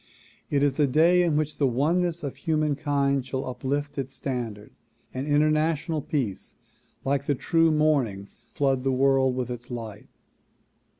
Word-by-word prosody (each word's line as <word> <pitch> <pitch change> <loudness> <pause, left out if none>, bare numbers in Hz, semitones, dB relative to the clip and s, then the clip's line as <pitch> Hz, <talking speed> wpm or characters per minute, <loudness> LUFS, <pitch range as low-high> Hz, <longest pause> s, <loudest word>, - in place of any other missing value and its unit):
It 140 -1 +1
is 145 0 +1
a 145 - +4
day 165 +6 +4
in 170 -4 +1
which 155 0 -1
the 140 - +2
oneness 165 +7 0
of 140 - -4
humankind 145 -3 0
shall 130 0 -3
uplift 140 +3 -3
its 135 0 -5
standard 115 -6 -5 0.4
and 130 +3 -4
international 155 +2 +1
peace 125 -11 -3 0.5
like 140 +1 0
the 145 - +2
true 165 +4 +2
morning 140 -11 +1 0.2
flood 135 -2 0
the 135 - +1
world 130 0 +3
with 125 -1 -3
its 120 0 -7
light. 115 -4 -7
140 Hz, 145 wpm, -26 LUFS, 130-155 Hz, 0.5 s, a